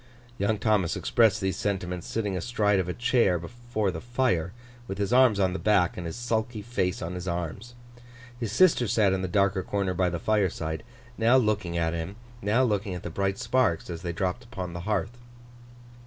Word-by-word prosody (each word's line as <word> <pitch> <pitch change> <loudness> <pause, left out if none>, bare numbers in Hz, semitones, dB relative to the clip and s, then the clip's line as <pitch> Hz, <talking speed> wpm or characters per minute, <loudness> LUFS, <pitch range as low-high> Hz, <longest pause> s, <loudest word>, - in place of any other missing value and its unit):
Young 105 +2 +1
Thomas 105 -5 +1
expressed 115 -4 +3
these 95 0 -1
sentiments 90 -3 -2
sitting 105 -4 -2
astride 105 0 +1
of 90 -1 -1
a - - -1
chair 120 -7 +3
before 110 +3 -3
the 80 -2 -6
fire, 120 -9 0 0.4
with 95 - -4
his 100 +3 -1
arms 125 -5 +5
on 95 -2 +2
the 95 - -3
back, 95 -5 +3
and 85 -2 -5
his 80 - -5
sulky 115 -2 -2
face 95 -7 -1
on 85 +2 -4
his 90 0 -6
arms. 90 +7 -4 0.6
His 115 -4 -3
sister 155 - +4
sat 105 -3 +3
in 95 - -1
the 95 - -1
darker 100 +1 +2
corner 95 0 -1
by 90 0 +1
the 85 - -3
fireside, 85 -5 0 0.4
now 115 +3 +5
looking 105 -8 0
at 80 -1 0
him, 85 +4 -4 0.3
now 110 +5 +2
looking 105 -5 0
at 90 - -7
the 85 - -5
bright 95 +2 -1
sparks 115 -11 +1
as 85 -1 -6
they 85 -1 -3
dropped 95 +7 -2
upon 95 -7 -6
the 85 - -5
hearth. 105 +2 -1
100 Hz, 195 wpm, -27 LUFS, 90-110 Hz, 0.6 s, arms